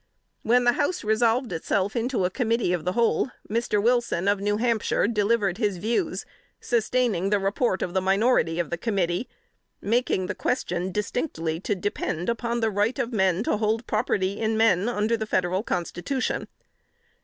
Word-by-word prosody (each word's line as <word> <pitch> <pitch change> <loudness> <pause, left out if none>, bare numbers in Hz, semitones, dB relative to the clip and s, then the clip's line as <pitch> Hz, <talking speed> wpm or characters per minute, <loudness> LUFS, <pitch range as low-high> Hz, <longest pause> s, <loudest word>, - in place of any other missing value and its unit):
When 245 +2 +3
the 240 - +5
House 300 +8 -1
resolved 225 +3 +2
itself 190 +5 -1
into 235 -5 0
committee 230 -4 0
of 175 -2 -2
the 180 - 0
whole, 235 +2 +2 0.2
Mr. 225 -1 0
Wilson, 235 -5 +1
of 200 0 +3
New 205 +1 0
Hampshire, 230 -3 +1
delivered 210 -3 +1
his 205 -5 0
views, 235 - -1 0.3
sustaining 230 -5 +1
the 205 - +3
report 195 +1 0
of 175 - -4
the 190 - +1
minority 195 -3 +2
of 170 -2 -2
the 170 - -2
committee; 190 -1 -1 0.5
making 225 -3 0
the - - -3
question 180 -7 -2
distinctly 180 - -2
to 205 +2 -1
depend 180 -2 -2
upon 235 0 -1
the 225 -1 +1
right 205 +4 0
of 240 +1 -2
men 190 -2 +2
to 215 - 0
hold 220 +2 0
property 205 -3 0
in 220 0 0
men, 220 -1 +3
under 220 0 +1
the 220 -1 -4
Federal 185 -1 0
Constitution. 195 +7 -2
210 Hz, 165 wpm, -25 LUFS, 190-235 Hz, 0.5 s, the